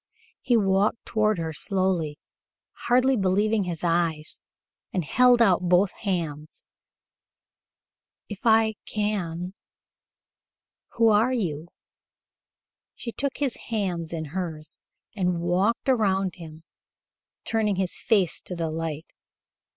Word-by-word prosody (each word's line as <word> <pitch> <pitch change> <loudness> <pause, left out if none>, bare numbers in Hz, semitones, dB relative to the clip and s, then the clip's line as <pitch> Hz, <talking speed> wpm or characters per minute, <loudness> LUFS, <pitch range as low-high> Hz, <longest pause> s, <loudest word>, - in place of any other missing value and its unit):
He 245 -2 +3
walked 200 +2 +1
toward 215 -2 +1
her 160 -1 -3
slowly, 185 -5 -1 0.7
hardly 255 +2 +4
believing 205 +1 +1
his 170 -2 -5
eyes, 165 -2 -1 0.5
and 180 -4 -2
held 245 - +5
out 185 -5 +3
both 180 +2 +4
hands. 160 -6 -4 1.6
"If 205 -2 -7
I 220 -2 +4
can. 185 -4 -2 1.4
Who 230 -1 +4
are 220 +4 +3
you?" 170 - -2 1.3
She 235 - -6
took 275 +3 -3
his 275 -4 -1
hands 180 -7 -2
in 160 -3 -4
hers 165 -5 -5 0.4
and 180 -3 0
walked 185 +9 0
around 195 -7 +2
him, 160 -2 -11 0.8
turning 215 -3 0
his 185 -1 -2
face 195 -7 +1
to 180 - -5
the 165 -2 -2
light. 160 -1 -5
190 Hz, 110 wpm, -25 LUFS, 170-220 Hz, 1.6 s, held